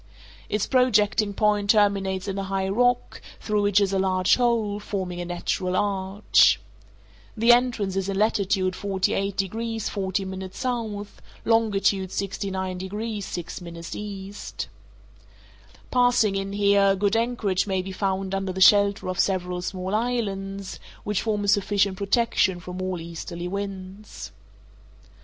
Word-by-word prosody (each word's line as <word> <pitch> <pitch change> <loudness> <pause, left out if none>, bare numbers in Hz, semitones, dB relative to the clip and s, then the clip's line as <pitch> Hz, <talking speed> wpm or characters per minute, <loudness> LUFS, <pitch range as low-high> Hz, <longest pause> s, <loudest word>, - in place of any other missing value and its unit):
Its 210 -1 0
projecting 215 -5 +3
point 205 0 +1
terminates 200 -3 +2
in 195 - -2
a 195 - -3
high 195 0 -1
rock, 245 +5 +1 0.2
through 210 -1 0
which 205 0 +3
is 195 -1 +1
a 195 - +2
large 185 -1 +3
hole, 230 -4 +1
forming 185 -4 -4
a - - -4
natural 180 +1 -2
arch. 195 +1 +3 0.8
The 230 +2 +5
entrance 240 -6 +2
is 195 0 -1
in 195 - -2
latitude 195 -3 +1
48 195 0 -1
degrees 225 +3 -2
40' 190 -1 -3
S., 190 +7 -7 0.8
longitude 200 -4 +2
69 190 -1 -3
degrees 205 +2 -4
6' 175 +1 -6 0.3
E. 200 -1 -6 1.6
Passing 245 -5 +3
in 195 0 -3
here, 200 -1 +4
good 200 +2 +1
anchorage 225 -5 0
may 190 -2 0
be 190 - -6
found 190 0 -2
under 195 -1 -1
the 185 - -5
shelter 200 0 +5
of 185 0 -3
several 180 -2 0
small 185 +1 -4
islands, 200 -4 -2 0.2
which 210 -2 -1
form 210 -2 -1
a - - -2
sufficient 200 -1 +2
protection 200 -3 +2
from 180 +1 -7
all 185 -1 -2
easterly 170 +1 -6
winds. 195 +1 -6
195 Hz, 135 wpm, -25 LUFS, 190-210 Hz, 1.6 s, The